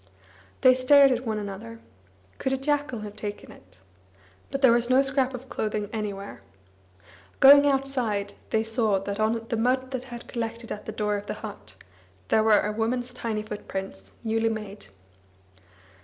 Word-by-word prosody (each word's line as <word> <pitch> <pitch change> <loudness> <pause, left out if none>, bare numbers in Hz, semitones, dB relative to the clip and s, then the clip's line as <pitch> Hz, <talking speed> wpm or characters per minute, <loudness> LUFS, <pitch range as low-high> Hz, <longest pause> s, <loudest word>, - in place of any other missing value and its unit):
They 255 - +7
stared 275 +2 +6
at 250 0 -1
one 220 -1 -1
another. 210 +3 -7 0.6
Could 265 - -1
a - - +1
jackal 285 -3 -1
have 210 -1 -8
taken 205 -1 -6
it? 90 0 -18 0.7
But 275 0 -4
there 260 - +8
was 240 +1 +2
no 260 +2 +5
scrap 265 -1 0
of 255 +2 -9
clothing 215 -3 -3
anywhere. 200 - -5 1.0
Going 285 +1 +8
outside, 255 -7 -1 0.2
they 220 - +1
saw 220 -3 +1
that 200 +2 -4
on 225 +1 0
the 230 - -1
mud 255 +3 0
that 255 -1 -4
had 240 -2 -9
collected 230 0 -5
at 210 - -6
the - - -3
door 210 -1 -1
of 205 0 -8
the - - -4
but - - -9 0.5
there 220 - +4
were 215 -1 +5
a 210 - -1
woman's 245 +3 -2
tiny 225 -3 -3
footprints, 190 - -7
newly 225 0 +1
made. 210 - -6
225 Hz, 165 wpm, -26 LUFS, 210-255 Hz, 1.0 s, there